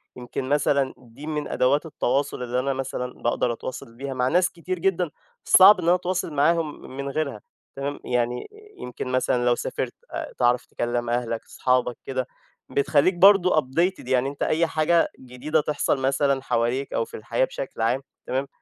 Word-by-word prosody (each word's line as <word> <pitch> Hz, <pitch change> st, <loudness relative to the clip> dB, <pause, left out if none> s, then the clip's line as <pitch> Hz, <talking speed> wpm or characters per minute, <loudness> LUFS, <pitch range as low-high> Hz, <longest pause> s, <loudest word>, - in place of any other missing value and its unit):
يمكن 125 Hz, +1 st, -5 dB
مثلًا 140 Hz, -2 st, +2 dB
دي 125 Hz, +5 st, -12 dB
من 150 Hz, -1 st, -2 dB
أدوات 140 Hz, +5 st, +1 dB
التواصل 140 Hz, -3 st, -1 dB
اللي 125 Hz, +1 st, -1 dB
أنا 135 Hz, +2 st, 0 dB
مثلًا 130 Hz, -1 st, -4 dB
باقدر 120 Hz, 0 st, +1 dB
أتواصل 115 Hz, -1 st, -8 dB
بيها 135 Hz, +2 st, -5 dB
مع 125 Hz, -1 st, 0 dB
ناس 180 Hz, +6 st, +3 dB
كتير 180 Hz, +1 st, -5 dB
جدًا 180 Hz, -3 st, 0 dB, 0.3 s
صعب 190 Hz, +1 st, +8 dB
إن 170 Hz, -, +1 dB
أتواصل 180 Hz, -2 st, 0 dB
معاهم 155 Hz, +1 st, +1 dB, 0.2 s
من 140 Hz, 0 st, -3 dB
غيرها، 140 Hz, -6 st, -3 dB, 0.3 s
تمام. 140 Hz, +1 st, -4 dB
يعني، 125 Hz, 0 st, -1 dB, 0.3 s
يمكن 125 Hz, +1 st, -6 dB
مثلًا 125 Hz, -1 st, +1 dB
لو 120 Hz, 0 st, +4 dB
سافِرت، -, -, -3 dB, 0.5 s
تعرف 125 Hz, 0 st, +2 dB
تكلِّم 120 Hz, 0 st, -2 dB
أهلك، 120 Hz, -1 st, -2 dB
أصحابك 125 Hz, -2 st, 0 dB
كده، 130 Hz, -1 st, -2 dB, 0.4 s
بتخلِّيك 145 Hz, +5 st, +3 dB
برضه 185 Hz, 0 st, +6 dB
updated، 165 Hz, +4 st, -1 dB
يعني 130 Hz, +1 st, +2 dB
أنت 140 Hz, -, -5 dB
أي 165 Hz, +1 st, +2 dB
حاجة 160 Hz, +2 st, +2 dB
جديدة 130 Hz, +5 st, -1 dB
تحصل 145 Hz, -1 st, 0 dB
مثلًا 135 Hz, 0 st, +1 dB
حواليك 125 Hz, +2 st, -1 dB
أو 115 Hz, -, 0 dB
في -, -, -9 dB
الحياة 115 Hz, +3 st, 0 dB
بشكل 130 Hz, -3 st, -6 dB
عام، 120 Hz, +4 st, +1 dB, 0.3 s
تمام، 135 Hz, +2 st, -1 dB
135 Hz, 160 wpm, -24 LUFS, 125-155 Hz, 0.5 s, صعب